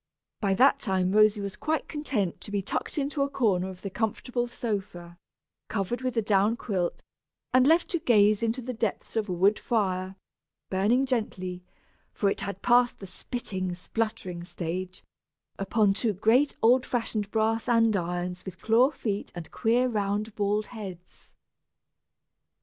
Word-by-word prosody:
By 195 Hz, -2 st, +1 dB
that 270 Hz, +5 st, +5 dB
time 190 Hz, -6 st, 0 dB
Rosy 215 Hz, 0 st, +4 dB
was 200 Hz, -1 st, -5 dB
quite 315 Hz, +1 st, -2 dB
content 260 Hz, -, -2 dB
to -, -, -7 dB
be 200 Hz, -1 st, -1 dB
tucked 260 Hz, -, -3 dB
into 285 Hz, 0 st, -1 dB
a 280 Hz, -, +1 dB
corner 195 Hz, -9 st, +1 dB
of 185 Hz, -1 st, -11 dB
the 195 Hz, -, -4 dB
comfortable 240 Hz, +3 st, -2 dB
sofa, 190 Hz, -7 st, -5 dB, 0.5 s
covered 220 Hz, +4 st, -2 dB
with 255 Hz, -2 st, -2 dB
a 225 Hz, -, +2 dB
down 205 Hz, +2 st, +2 dB
quilt, 185 Hz, -8 st, -2 dB, 0.5 s
and 255 Hz, +1 st, +5 dB
left 330 Hz, +3 st, +4 dB
to 350 Hz, -5 st, 0 dB
gaze 215 Hz, -7 st, +4 dB
into 230 Hz, +2 st, -1 dB
the 250 Hz, +1 st, -4 dB
depths 225 Hz, -3 st, -3 dB
of 215 Hz, -2 st, -1 dB
a -, -, -1 dB
woodfire, 190 Hz, 0 st, +1 dB, 0.6 s
burning 215 Hz, +8 st, +2 dB
gently 185 Hz, -8 st, -2 dB, 0.5 s
(for 200 Hz, -2 st, +1 dB
it -, -, -3 dB
had 195 Hz, -1 st, -5 dB
passed 245 Hz, 0 st, +4 dB
the 195 Hz, -, -9 dB
spitting, 185 Hz, -3 st, -4 dB
spluttering 185 Hz, -3 st, -3 dB
stage), 180 Hz, +1 st, -5 dB, 0.6 s
upon 200 Hz, 0 st, +2 dB
two 215 Hz, +2 st, 0 dB
great 230 Hz, +9 st, +3 dB
old 245 Hz, +3 st, +5 dB
fashioned 220 Hz, -5 st, -2 dB
brass 225 Hz, +2 st, 0 dB
andirons 180 Hz, -6 st, +1 dB
with 185 Hz, -2 st, -9 dB
claw 235 Hz, +4 st, +4 dB
feet 210 Hz, -8 st, -4 dB
and 175 Hz, -2 st, -8 dB
queer 245 Hz, +2 st, +2 dB
round 210 Hz, -1 st, -1 dB
bald 210 Hz, +1 st, 0 dB
heads. 185 Hz, -6 st, -10 dB
210 Hz, 150 wpm, -27 LUFS, 190-240 Hz, 0.6 s, that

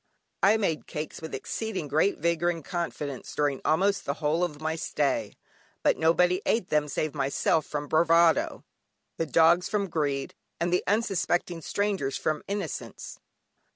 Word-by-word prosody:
I 205 Hz, +3 st, +5 dB
made 170 Hz, -8 st, -1 dB
cakes 150 Hz, +1 st, -5 dB
with 160 Hz, -, -5 dB
exceeding 220 Hz, -8 st, -4 dB
great 155 Hz, +8 st, +2 dB
vigour 170 Hz, 0 st, +1 dB
and 165 Hz, -3 st, -4 dB
confidence 150 Hz, -6 st, -4 dB
during 145 Hz, -2 st, 0 dB
almost 195 Hz, +5 st, +2 dB
the 140 Hz, -, -2 dB
whole 155 Hz, +3 st, 0 dB
of 150 Hz, -4 st, -3 dB
my 160 Hz, +1 st, -2 dB
stay, 150 Hz, -3 st, -1 dB, 0.5 s
but -, -, +4 dB
nobody 180 Hz, +3 st, +3 dB
ate 225 Hz, -5 st, 0 dB
them 150 Hz, -1 st, +2 dB
save 150 Hz, +1 st, -2 dB
myself 140 Hz, +3 st, +1 dB
from 145 Hz, -1 st, -4 dB
bravado, 165 Hz, +2 st, +3 dB, 0.5 s
the 165 Hz, -, -1 dB
dogs 170 Hz, +3 st, +4 dB
from 200 Hz, -3 st, -1 dB
greed, 140 Hz, -4 st, -1 dB, 0.3 s
and 170 Hz, +1 st, 0 dB
unsuspecting 180 Hz, -5 st, 0 dB
strangers 195 Hz, -6 st, -1 dB
from 155 Hz, -1 st, -1 dB
innocence. 200 Hz, -6 st, -5 dB
165 Hz, 145 wpm, -27 LUFS, 150-180 Hz, 0.5 s, I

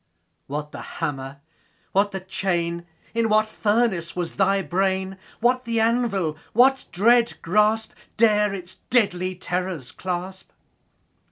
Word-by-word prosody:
What 150 Hz, +1 st, -4 dB
the -, -, -8 dB
hammer? 135 Hz, 0 st, -5 dB, 0.5 s
what 200 Hz, +1 st, +3 dB
the 190 Hz, -1 st, -5 dB
chain? 175 Hz, -2 st, -2 dB, 0.3 s
In 230 Hz, -1 st, +1 dB
what 215 Hz, 0 st, +4 dB
furnace 210 Hz, -6 st, 0 dB
was 175 Hz, -2 st, -3 dB
thy 195 Hz, 0 st, +2 dB
brain? 190 Hz, +1 st, 0 dB, 0.3 s
What 250 Hz, +2 st, +3 dB
the 230 Hz, -2 st, -1 dB
anvil? 220 Hz, -9 st, +1 dB, 0.2 s
What 265 Hz, +3 st, +4 dB
dread 235 Hz, +5 st, +4 dB
grasp 215 Hz, +4 st, +2 dB
15 -, -, -25 dB
Dare 210 Hz, -2 st, +4 dB
its 185 Hz, -1 st, -7 dB
deadly 185 Hz, -6 st, +1 dB
terrors 180 Hz, -6 st, -3 dB
clasp? 185 Hz, +1 st, -5 dB
190 Hz, 125 wpm, -24 LUFS, 175-220 Hz, 0.5 s, what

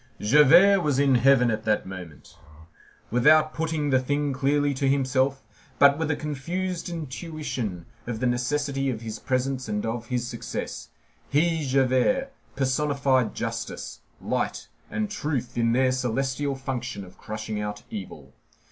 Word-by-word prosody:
Javert 160 Hz, -, +6 dB
was 150 Hz, -5 st, +1 dB
in 140 Hz, -1 st, +4 dB
heaven 125 Hz, -1 st, +5 dB
at 110 Hz, 0 st, -2 dB
that 110 Hz, -1 st, +1 dB
moment. 90 Hz, -6 st, -10 dB, 0.8 s
Without 155 Hz, +6 st, +5 dB
putting 160 Hz, -3 st, -1 dB
the 130 Hz, -, +4 dB
thing 145 Hz, +2 st, -1 dB
clearly 145 Hz, +1 st, +1 dB
to 135 Hz, +1 st, -1 dB
himself, 135 Hz, 0 st, +1 dB, 0.3 s
but 140 Hz, +1 st, +6 dB
with 160 Hz, -1 st, -1 dB
a 145 Hz, -, +1 dB
confused 170 Hz, +6 st, -3 dB
intuition 145 Hz, -, -5 dB, 0.2 s
of 115 Hz, -3 st, -3 dB
the 125 Hz, -, -1 dB
necessity 135 Hz, +3 st, 0 dB
of 115 Hz, -4 st, -3 dB
his 110 Hz, -1 st, -6 dB
presence 130 Hz, 0 st, -1 dB
and 105 Hz, 0 st, -2 dB
of 115 Hz, 0 st, -3 dB
his 125 Hz, 0 st, -1 dB
success, 120 Hz, -, -6 dB, 0.4 s
he, 160 Hz, +2 st, +2 dB
Javert, 135 Hz, -, +2 dB, 0.2 s
personified 135 Hz, -2 st, +1 dB
justice, -, -, -5 dB, 0.2 s
light, -, -, -2 dB, 0.2 s
and 215 Hz, -1 st, -2 dB
truth 140 Hz, -, -3 dB
in 115 Hz, -1 st, +2 dB
their 130 Hz, +2 st, +3 dB
celestial 130 Hz, +3 st, -1 dB
function 130 Hz, -5 st, -4 dB
of 90 Hz, -, -17 dB
crushing 110 Hz, 0 st, -5 dB
out 105 Hz, 0 st, -5 dB
evil. 75 Hz, -10 st, -8 dB
135 Hz, 140 wpm, -25 LUFS, 120-145 Hz, 0.8 s, Javert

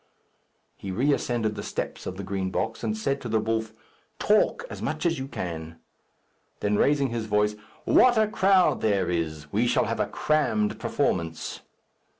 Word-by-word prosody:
He 100 Hz, -, -7 dB
re 130 Hz, +10 st, +2 dB
ascended 115 Hz, -5 st, -1 dB
the -, -, -5 dB
steps -, -, -5 dB
of 95 Hz, -, -5 dB
the 100 Hz, -, -5 dB
Green 95 Hz, -1 st, -2 dB
Box, 110 Hz, +4 st, -3 dB
and 215 Hz, -, -1 dB
said 140 Hz, -10 st, -1 dB
to 120 Hz, -, -5 dB
the 110 Hz, 0 st, +2 dB
wolf, 110 Hz, 0 st, -1 dB, 0.5 s
"Talk 215 Hz, -, +2 dB
as -, -, -8 dB
much -, -, -3 dB
as 165 Hz, -3 st, +1 dB
you 135 Hz, -, -4 dB
can." 80 Hz, -, -6 dB, 0.8 s
Then, 105 Hz, 0 st, +1 dB
raising 140 Hz, +4 st, +3 dB
his 115 Hz, -2 st, -3 dB
voice, 105 Hz, 0 st, +2 dB, 0.3 s
"What 245 Hz, -2 st, +5 dB
a 215 Hz, -1 st, +4 dB
crowd 190 Hz, -2 st, +3 dB
there 100 Hz, -4 st, +1 dB
is! 80 Hz, -3 st, -3 dB
We 115 Hz, +4 st, +2 dB
shall -, -, +2 dB
have -, -, -2 dB
a -, -, +1 dB
crammed 110 Hz, -9 st, 0 dB
performance." 80 Hz, -3 st, -1 dB
110 Hz, 170 wpm, -26 LUFS, 95-145 Hz, 0.8 s, What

